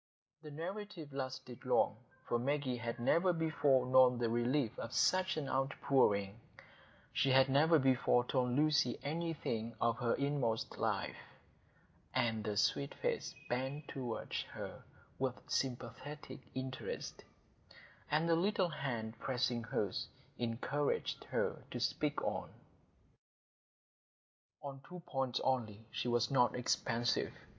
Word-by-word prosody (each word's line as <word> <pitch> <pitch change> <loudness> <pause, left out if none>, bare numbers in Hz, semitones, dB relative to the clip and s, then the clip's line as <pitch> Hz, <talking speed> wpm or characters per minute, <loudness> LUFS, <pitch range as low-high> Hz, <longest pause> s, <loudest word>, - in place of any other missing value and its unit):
The 155 - -9
narrative 170 0 -6
lasted 130 -2 -5
long, - - +3 0.3
for 120 - +1
Maggie 135 0 0
had 115 0 -4
never 170 +9 +4
before 155 -6 +3
known 130 -1 +6
the 120 -1 0
relief 120 +1 +2
of - - -5
such 185 -1 +3
an 150 -3 -2
outpouring; 130 -7 +2 0.7
she 135 - +2
had 130 0 +6
never 155 +5 +5
before 130 -3 +3
told 125 -1 +1
Lucy 150 -1 +3
anything 145 -8 -2
of 115 -1 +1
her 120 -2 +2
inmost 140 -6 -1
life; - - 0 1.0
and 110 -2 +1
the 105 -1 -2
sweet 140 +6 +1
face 485 -1 -2
bent 135 +4 -2
toward 125 -4 -4 0.2
her - - -6 0.4
with 130 -1 0
sympathetic 130 +4 -3 0.2
interest, 130 0 -5 0.9
and 155 +3 +2
the 165 - +4
little 190 +1 +2
hand 120 -7 -3
pressing 125 -2 0
hers, 105 -4 -1 0.3
encouraged 125 +5 -1
her - - -1
to - - -4
speak - - 0
on. - - -2 2.1
On 135 -1 -6
two 180 0 -8
points 130 -3 -1
only 115 -5 0
she - - -2
was 120 +1 +2
not 125 -2 +4
expansive. 120 -1 +1
130 Hz, 120 wpm, -36 LUFS, 120-150 Hz, 2.1 s, known